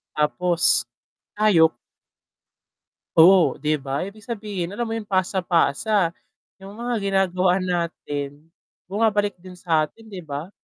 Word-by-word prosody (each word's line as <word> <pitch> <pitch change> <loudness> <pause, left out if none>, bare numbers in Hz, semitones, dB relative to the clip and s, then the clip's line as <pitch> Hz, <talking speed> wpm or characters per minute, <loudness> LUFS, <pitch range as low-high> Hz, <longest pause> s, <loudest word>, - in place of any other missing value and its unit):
tapos 155 -5 +2 0.5
tayo 185 - +4 1.4
Oh, 175 +1 +7
'di 155 0 +1
ba? 135 0 -4
Ibig 200 +3 -8
sabihin 205 -6 -4
alam 230 +2 -3
mo - - -2
'yong 220 - -6
pasa-pasa. 185 0 +1 0.5
Yung 195 0 -11
mga 240 +3 -4
ginagawa 190 -2 +1
natin, 160 -4 -4 0.4
bumabalik 205 -1 +1
din 180 +1 -12
sa 165 -4 +1
atin, 220 +8 -18
'di 185 -5 -9
ba? 145 +4 -6
185 Hz, 120 wpm, -23 LUFS, 165-205 Hz, 1.4 s, Oh